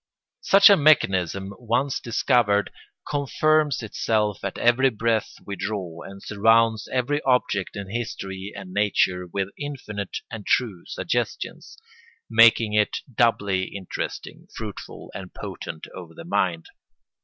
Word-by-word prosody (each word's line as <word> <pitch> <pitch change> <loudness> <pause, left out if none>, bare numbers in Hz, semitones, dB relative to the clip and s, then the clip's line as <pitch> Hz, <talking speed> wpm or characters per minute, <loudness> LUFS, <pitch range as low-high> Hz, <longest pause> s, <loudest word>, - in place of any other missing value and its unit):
Such 200 +1 +7
a - - +8
mechanism 95 - +2
once 125 +4 0
discovered 115 -3 +2 0.4
confirms 150 -1 +1
itself 105 -1 -1
at 100 - -4
every 125 +3 +4
breath 115 -1 -1
we 100 - -5
draw, 95 -6 -4
and 100 0 -10
surrounds 115 +1 +3
every 135 +4 0
object 125 -7 0
in 100 -2 -5
history 100 -4 -5
and 95 -2 -9
nature 95 -3 +1
with 100 +1 -2
infinite 125 -9 -5
and 115 -3 -6
true 100 -5 0
suggestions, - - -3 0.5
making 115 -1 +6
it 105 -1 +2 0.2
doubly 100 -5 +2
interesting, 95 -2 -6
fruitful, 110 -3 -8
and 95 -2 -9
potent 80 - -7
over 85 -3 -10
the 85 - -10
mind. 90 -3 0
105 Hz, 120 wpm, -24 LUFS, 95-120 Hz, 0.5 s, a